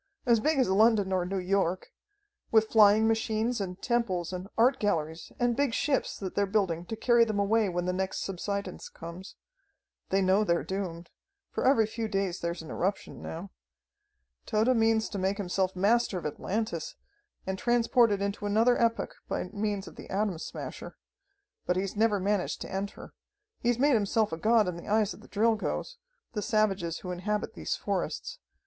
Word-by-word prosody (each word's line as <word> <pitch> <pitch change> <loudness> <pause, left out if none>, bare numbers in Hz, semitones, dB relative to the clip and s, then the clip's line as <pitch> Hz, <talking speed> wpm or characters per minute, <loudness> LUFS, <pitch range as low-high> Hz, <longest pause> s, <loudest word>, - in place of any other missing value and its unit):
As 235 -3 +4
big 305 +6 +1
as 260 - +3
London 205 0 +4
or 180 -1 +1
New 195 +1 -2
York. 185 -1 0 0.6
With 220 -1 +3
flying 215 0 +6
machines 225 +1 0
and 180 -1 -5
temples 190 -8 0
and 180 +1 -5
art 255 +4 +4
galleries 160 -5 -1
and 240 -1 +2
big 275 -3 +1
ships 280 -3 0
that 190 -2 -5
they're 200 0 +1
building 190 -5 0
to 225 - -3
carry 235 +1 +4
them 215 -3 -1
away 205 +1 +2
when 175 0 -2
the 180 - 0
next 190 +1 -2
subsidence 200 0 -4
comes. 170 +3 -9 0.7
They 195 0 +2
know 190 +3 +4
they're 170 -4 +1
doomed, 180 -3 -5 0.4
for - - 0
every 230 -5 +5
few 225 +1 -4
days 195 -3 -1
there's 170 0 -3
an 160 - -9
eruption 195 +3 -2
now. 175 +4 -7 1.0
"Tode 225 +4 +2
means 225 -1 +3
to 200 - -4
make 190 +2 0
himself 190 -1 -1
master 210 +2 +2
of 175 - -6
Atlantis, 220 - -3 0.5
and 190 0 -3
transport 240 -1 +3
it 200 -1 0
into 200 +1 -2
another 225 +5 +3
epoch 230 -1 +1 0.2
by 180 - -2
means 205 -2 -2
of - - -12
the - - -10
Atom 195 -4 -1
Smasher. - - -7 0.7
But 180 - +2
he's 190 +2 -2
never 210 -1 +2
managed 200 0 0
to - - -6
enter. 195 +1 -5 0.5
He's 240 -1 +1
made 285 +3 +4
himself 215 0 +2
a 160 - -3
god 220 +3 +3
in 180 -2 -3
the 170 - -10
eyes 215 -1 +2
of - - -14
the - - -15
Drilgoes, 225 - 0 0.4
the 210 - -2
savages 195 -6 0
who 180 - -5
inhabit 205 +4 -2
these - - -2
forests. - - -3
205 Hz, 180 wpm, -29 LUFS, 185-225 Hz, 1.0 s, flying